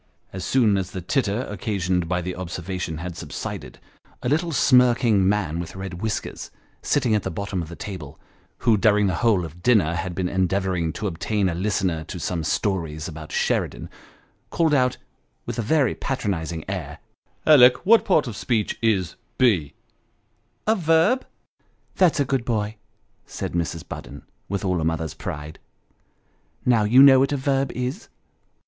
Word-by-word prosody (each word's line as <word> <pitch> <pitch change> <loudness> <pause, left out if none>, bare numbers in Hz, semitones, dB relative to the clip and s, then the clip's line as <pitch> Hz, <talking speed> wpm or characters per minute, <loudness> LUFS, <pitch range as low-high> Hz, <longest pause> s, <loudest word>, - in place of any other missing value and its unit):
As 95 - -5
soon 115 -6 +3
as 95 -1 -4
the 95 - -6
titter 115 - 0
occasioned 95 -4 -1
by 90 -1 0
the 90 +1 -3
observa 90 +1 -5
tion, 80 -3 -3
had 85 +1 -6
subsided, - - -6 0.5
a 125 - 0
little 165 +4 +1
smirking 120 -8 +4
man 90 -6 0
with 85 +1 -6
red 95 -2 -6
whiskers, 110 -2 -4 0.3
sitting 125 -6 +1
at 105 - +2
the - - -4
bottom 100 +1 -3
of 80 - -7
the 85 - -8
table, 80 -8 -8 0.5
who 115 -3 +5
during 105 0 +3
the 95 - +1
whole 105 -7 +3
of 80 +2 -11
dinner 100 -9 +3
had 85 +1 -3
been 90 0 -1
endeavouring 95 -2 0
to - - -5
obtain 100 +2 -1
a 90 - -1
listener 90 -3 -1
to 90 - -7
some 85 0 -2
stories 80 -4 -1
about 80 -2 -9
Sheridan, - - -1 0.6
called 160 -2 +1
out, 125 -3 +2 0.5
with 120 0 -4
a - - +2
very 140 +4 +2
patronising 85 - -3
air, 90 -7 -5 0.3
" - - -41
Alick, 130 -5 +6
what 225 +3 +6
part 160 -6 +3
of 120 -5 -6
speech 110 -1 -1
is 100 -6 +1 0.2
be." 95 - +2 0.9
A 220 - +3
verb." 165 +8 +2 0.3
" - - -41
That's 180 -5 +4
a 140 - +2
good 130 -2 0
boy," 110 -2 -2 0.5
said - - -5
Mrs. 85 -1 -3
Budden, - - -8 0.3
with 100 +1 -2
all 90 -3 0
a - - -1
mother's 80 -1 -1
pride. 75 0 -7 0.6
" - - -40
Now, 115 -4 +3
you 125 +6 +7
know 135 -2 +8
what 135 +2 +2
a 145 - 0
verb 135 0 0
is 125 +2 -4
100 Hz, 170 wpm, -23 LUFS, 85-125 Hz, 0.9 s, know